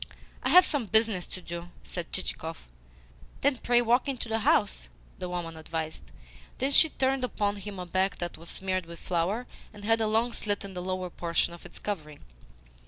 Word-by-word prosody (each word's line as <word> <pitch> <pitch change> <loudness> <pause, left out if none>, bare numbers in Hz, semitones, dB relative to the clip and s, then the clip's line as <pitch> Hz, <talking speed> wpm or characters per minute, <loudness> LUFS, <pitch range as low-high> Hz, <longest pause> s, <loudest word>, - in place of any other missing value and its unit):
"I - - 0
have 365 0 +9
some 275 -7 0
business 220 -4 +4
to 185 - -8
do," 170 0 -6
said - - -5
Chichikov. - - -4 0.7
"Then 280 -2 +3
pray 240 0 +4
walk 245 +4 +3
into 260 -3 -3
the 225 0 0
house," 205 - +2 0.3
the 180 - -3
woman 175 -2 -3
advised. 160 0 -4 0.6
Then 270 +2 +1
she 320 +3 +7
turned 265 -2 +1
upon 205 -4 0
him 200 0 -6
a 180 - -4
back 185 +2 +1
that 175 -1 -4
was 165 +2 -10
smeared 185 -2 -1
with 170 0 -8
flour 185 +7 0 0.3
and 205 -1 -10
had 225 +1 +3
a 220 - +3
long 225 +3 +2
slit 205 -1 -1
in 195 - -8
the 180 - -4
lower 185 0 -2
portion 170 0 +1
of 170 - -10
its - - -13
covering. 155 -8 -5
195 Hz, 190 wpm, -29 LUFS, 170-230 Hz, 0.7 s, have